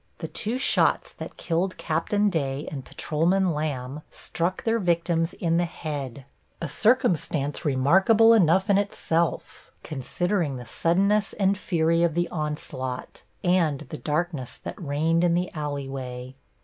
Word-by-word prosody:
The - - -5
two 225 +4 -1
shots 260 - +2
that - - -9
killed 180 +3 -1
Captain 205 +6 0
Day 140 -3 -2
and 140 -3 -5
Patrolman 175 +7 +1
Lamb 145 -2 -3
struck 175 +3 -3
their 230 0 +1
victims 170 -2 0
in 165 -1 0
the 175 - +2
head, 140 -6 -6 0.3
a 170 - -3
circumstance 160 - +1
remarkable 190 - +5
enough 190 -2 +4
in 200 -1 +4
itself, 170 -5 -2
considering 160 +2 -1
the 125 -1 -7
suddenness 200 - +1
and 195 -1 +2
fury 165 -3 +1
of 170 -2 +2
the 175 0 +1
onslaught 150 -5 -4 0.2
and 175 -6 +2
the 155 - -4
darkness 150 -4 -2
that - - -7
reigned 160 +3 +1
in 170 -1 +3
the 180 +1 -1
alley 145 -3 -3
way. 130 -1 -6
165 Hz, 140 wpm, -25 LUFS, 145-185 Hz, 0.3 s, remarkable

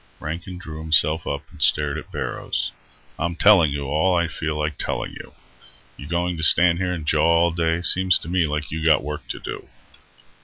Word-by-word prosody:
Rankin 85 +4 -6
drew 80 -3 -9
himself 80 0 +2
up 70 - -3
and - - -13
stared 75 -1 +3
at 75 - -8
Barrows. - - -3 0.5
"I'm 85 0 -2
telling 90 -5 +5
you 70 0 -3
all 80 +7 +1
I 85 -1 +1
feel 80 -1 -4
like 75 -1 -3
telling - - -3
you. - - -12 0.6
You 70 - -10
going 85 +1 -2
to 80 - -2
stand 85 +2 +5
here 90 -1 -1
and 80 -4 -5
jaw - - +2 0.2
all 85 - +2
day? 85 +1 -1
Seems 90 0 +4
to - - -9
me 85 -1 +1
like 75 0 -4
you 80 0 -4
got 80 -3 +3
work 75 +1 -6
to - - -5
do." - - -8
80 Hz, 200 wpm, -22 LUFS, 75-85 Hz, 0.6 s, telling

